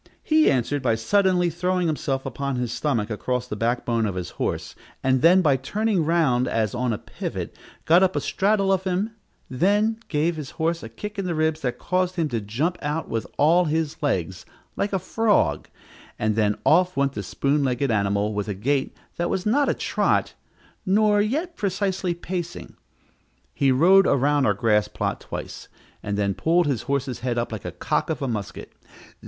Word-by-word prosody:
He 310 0 +4
answered 135 +2 0
by 115 - +2
suddenly 180 - +2
throwing 180 +2 0
himself 140 -4 -1
upon 140 -1 -3
his 125 -2 -2
stomach 115 -6 -1
across 125 +3 -2
the 105 - -4
backbone 115 0 0
of 100 - -4
his 90 -1 -5
horse, - - -3 0.3
and 130 -1 +2
then, 180 +4 +6
by 140 -4 +4
turning 205 - 0
round 150 -7 +2
as 110 -4 0
on 125 0 -1
a 110 - -1
pivot, - - -6 0.3
got 170 +3 +5
up 190 -1 +2
a - - +2
straddle 195 -1 +1
of 190 -1 0
him; 190 +4 -1 0.4
then 205 - +1
he - - -28
gave 160 +2 0
his 145 -3 -6
horse 165 0 0
a 115 - -8
kick 210 - -7
in 195 - -2
the 175 -2 -2
ribs 155 0 0
that 125 -2 -2
caused 185 0 -1
him 165 -4 0
to 115 -4 -2
jump 135 - -2
out 150 +3 -3
with 115 - -2
all 170 +5 +4
his 160 0 -2
legs, 95 - -1 0.3
like 200 - -1
a 195 - +1
frog, 190 - +1 0.5
and 110 -1 0
then 105 -2 +1
off 180 +3 +3
went 140 0 +1
the - - -4
spoon 140 +1 0
legged 130 0 0
animal 100 0 0
with 105 0 -3
a 105 - -3
gait 135 +7 -1 0.2
that 175 0 -1
was 190 - -2
not 270 +6 +2
a - - +3
trot, - - 0 0.5
nor 210 +1 +3
yet 310 - -2
precisely 190 - -1
pacing. 175 0 -6 0.8
He 135 -1 +2
rode 185 +9 +5
around 140 0 +2
our - - +2
grass 105 -3 +2
plot - - -3
twice, - - -7 0.3
and 100 -1 -3
then 100 -1 +1
pulled 170 - +2
his 135 -6 0
horse's 140 -2 -1
head 120 -1 -2
up 120 0 -1
like 110 -3 -5
the 90 - -6
cock 150 - -1
of 155 -3 -2
a - - -1
musket. 105 -5 -5
150 Hz, 190 wpm, -24 LUFS, 120-185 Hz, 0.8 s, then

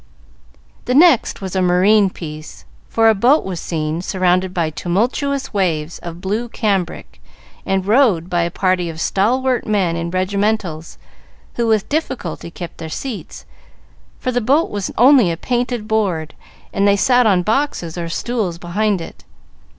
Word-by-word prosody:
The 250 - 0
next 310 -9 +4
was 190 -1 -5
a 190 - +2
marine 190 +3 +4
piece, 155 -3 -9 0.2
for 225 0 +3
a 220 - +6
boat 245 +9 +3
was 185 -3 -4
seen, 160 0 -3
surrounded 185 0 +1
by 170 -4 -1
tumultuous 245 - -1
waves 170 -5 -1
of 170 0 -8
blue 215 +6 -2
cambric, 195 -6 -2 0.5
and 190 -1 0
rowed 210 -7 +3
by 175 -1 0
a 170 - 0
party 185 -1 0
of 160 -1 -8
stalwart 250 +8 +1
men 195 -6 +1
in 170 0 -3
regimentals, 185 -3 -2 0.6
who 235 -1 -1
with 220 -3 +1
difficulty 260 - -3
kept 170 0 -9
their 160 - -6
seats, 215 - -6 0.7
for 255 - -2
the 245 0 0
boat 280 +8 +2
was 205 -2 -3
only 250 -4 +6
a 165 - -2
painted 240 0 -2
board, 185 -8 -1 0.4
and 200 +1 +2
they 200 - +5
sat 245 +2 +4
on 185 -4 +3
boxes 220 - -1
or 170 -1 -4
stools 205 -2 -2
behind 190 +3 -1
it. - - -10
195 Hz, 155 wpm, -18 LUFS, 175-230 Hz, 0.7 s, a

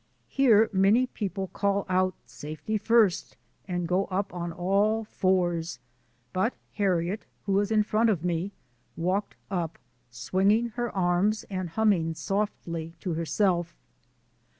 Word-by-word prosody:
Here 225 -5 +5
many 200 +6 +4
people 195 -5 -4
call 200 0 0
out 185 0 +1
" - - -42 0.2
safety 155 +8 -3
first 215 -3 +2
" - - -40
and 175 -2 -2
go 185 +3 +1
up 195 +1 -2
on 175 -1 -4
all 200 +6 +1
fours, 175 - 0 0.6
but 190 +7 0 0.2
Harriet, 190 0 0 0.2
who 200 - -1
was 200 +2 +2
in 215 -1 +4
front 220 +2 +2
of 180 -5 0
me, 175 +2 -1 0.5
walked 185 +5 -1 0.2
up 170 -4 -2 0.3
swinging 190 - +1
her 240 +1 -3
arms 190 +4 +1
and 185 -2 -3
hum 220 +6 +2
ming 165 -5 +1
softly 170 -5 -3
to 180 - -2
herself. 170 +1 0
190 Hz, 140 wpm, -27 LUFS, 175-210 Hz, 0.6 s, Here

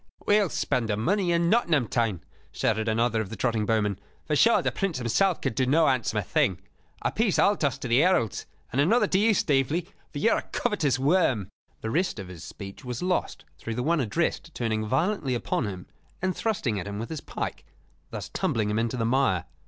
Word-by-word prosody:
"We 205 +1 +5
will 200 -4 +1
spend 115 -5 -1
the 105 - 0
money 180 - +1
in 170 0 +2
Nottingham 170 - +2
town," 110 -8 -1 0.3
shouted 110 0 0
another 115 0 +1
of 105 - -5
the 115 - -6
trotting 115 -4 0
bowmen. 105 -3 +1 0.3
"For 150 - 0
sure 230 +10 +4
the - - +1
Prince 195 -7 -2
himself 130 - +1
could - - -1
do 130 +2 0
no 155 +5 +4
handsomer 120 -6 +1
thing. 90 -1 +1 0.4
A 120 - +1
piece 215 - +1
I'll 205 - +4
toss 145 - 0
to - - -5
the 120 +2 +4
heralds, 150 - +2 0.2
and 135 - +2
another 225 +12 +4
to 190 - +1
you, 215 +1 +4
Staveley, 150 +4 +1 0.2
for - - -7
you 225 +10 +3
are - - +3
a - - -5
covetous 160 - 0
worm 135 - +2 0.2
" - - -40
The 110 - -3
rest 180 +2 0
of 95 -3 -7
his 90 -3 -10
speech 100 -1 -9
was 125 +3 -5
lost 180 -1 -1
through 115 +6 -5
the 125 - -2
one 165 +3 +2
addressed 160 +6 -1
turning 110 -2 -1
violently 160 - 0
upon 120 -1 -1
him 95 -3 -6 0.3
and 185 0 -1
thrusting 130 - -1
at 95 - -6
him 100 0 -5
with 115 +2 -5
his 155 - -4
pike, - - -5 0.5
thus - - -6
tumbling 105 -2 -1
him 105 - 0
into 115 +2 -1
the 115 - 0
mire. 115 -8 +2
130 Hz, 215 wpm, -26 LUFS, 110-170 Hz, 0.5 s, We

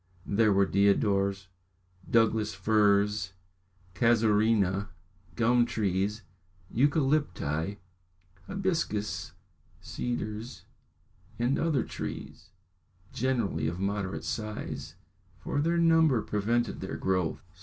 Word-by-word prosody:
There 110 +1 +3
were 100 0 +4
deodars, 100 0 +2 0.6
Douglas 110 -2 +2
firs, 105 -2 +2 0.6
casuarinas, 105 -2 +2 0.5
gum 120 +4 +3
trees, 100 0 -1 0.5
eucalypti, 135 - +1 0.7
hibiscus, 170 - -2 0.5
cedars, 120 0 -5 0.7
and 125 +6 +1
other 155 -7 +1
trees, - - -7 0.6
generally 120 -9 0
of 85 +2 -3
a - - -6
moderate 100 -1 -2
size, 95 -9 -5 0.4
for 140 +10 -2
their 165 +3 +1
number 160 -7 +4
prevented 115 +3 -1
their 95 - -4
growth. 90 -3 -1
105 Hz, 85 wpm, -29 LUFS, 100-120 Hz, 0.7 s, were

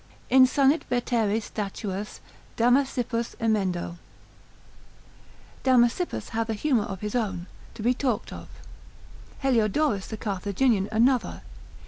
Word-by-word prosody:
Insanit 265 +3 +5
veteres 230 -3 0
statuas 205 -1 -5 0.4
Damasippus 245 -1 +1
emendo, 190 -6 -1 1.6
Damasippus 255 +6 +2
hath 225 0 -2
an 220 - 0
humour 245 -4 +1
of 195 -2 -7
his 210 0 -4
own, 195 -8 -2 0.3
to 215 - -7
be 245 +2 +3
talked 250 -4 -2
of: - - -9 1.0
Heliodorus 230 -2 +1
the 220 - -6
Carthaginian 205 +1 0
another. 240 +3 +1
225 Hz, 100 wpm, -26 LUFS, 205-255 Hz, 1.6 s, Insanit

